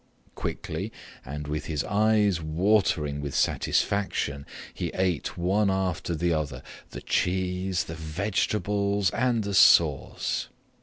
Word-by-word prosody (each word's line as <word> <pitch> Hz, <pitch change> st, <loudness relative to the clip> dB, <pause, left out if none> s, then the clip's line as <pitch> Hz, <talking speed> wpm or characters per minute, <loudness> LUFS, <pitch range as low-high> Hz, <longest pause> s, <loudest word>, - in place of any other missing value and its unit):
Quickly -, -, -4 dB, 0.3 s
and 75 Hz, +2 st, -6 dB
with 75 Hz, +1 st, -3 dB
his 75 Hz, -3 st, -1 dB
eyes 105 Hz, -3 st, +2 dB
watering 80 Hz, -3 st, +1 dB
with 70 Hz, -2 st, -5 dB
satisfaction, 70 Hz, -8 st, 0 dB, 0.3 s
he -, -, -3 dB
ate 90 Hz, -4 st, -1 dB
one 95 Hz, +4 st, +2 dB
after 95 Hz, -3 st, -1 dB
the 85 Hz, +2 st, +1 dB
other 70 Hz, -5 st, -3 dB, 0.3 s
the -, -, -8 dB
cheese, 90 Hz, 0 st, 0 dB
the 80 Hz, -, -7 dB
vegetables, 100 Hz, +4 st, 0 dB
and 120 Hz, -3 st, +1 dB
the 100 Hz, 0 st, -3 dB
sauce. -, -, +4 dB
90 Hz, 115 wpm, -27 LUFS, 80-100 Hz, 0.3 s, sauce